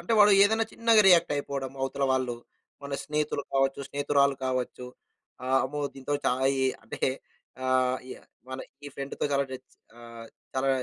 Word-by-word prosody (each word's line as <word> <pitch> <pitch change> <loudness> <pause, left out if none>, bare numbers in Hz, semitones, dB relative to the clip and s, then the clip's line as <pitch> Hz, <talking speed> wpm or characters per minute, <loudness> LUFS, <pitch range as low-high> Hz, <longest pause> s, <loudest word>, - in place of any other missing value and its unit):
అంటే 175 +6 -2
వాడు 205 -1 +7
ఏదన్నా 220 +2 +3
చిన్నగా 230 -2 +4
రియాక్టయిపోడము 140 -6 +2
అవతల 140 +1 -1
వాళ్ళు. 130 -2 -1 0.5
మన 140 0 -7
స్నేహితులు 150 -1 -1
కావచ్చు, 135 0 +1
స్నేహితురాళ్ళు 140 -1 +2
కావచ్చు, 125 -1 -3 0.6
ఆహ్, 130 +1 +3
అమ్మో! 145 +3 -4
దీంతో 135 +2 -3
చా - - +4 0.3
ఇ - - +3 0.2
అంటే 115 - -9 0.7
ఆహ్, 130 0 +2
య - - -7 0.3
మన 130 - -5 0.3
ఈ - - -5
ఫ్రెండ్‌తో 140 0 -4
చాలా 140 0 +2
టెన్స్ 130 0 -10 0.2
ఆహ్, 115 -1 -11 0.3
చాలా 135 +1 0
135 Hz, 150 wpm, -28 LUFS, 130-145 Hz, 0.7 s, వాడు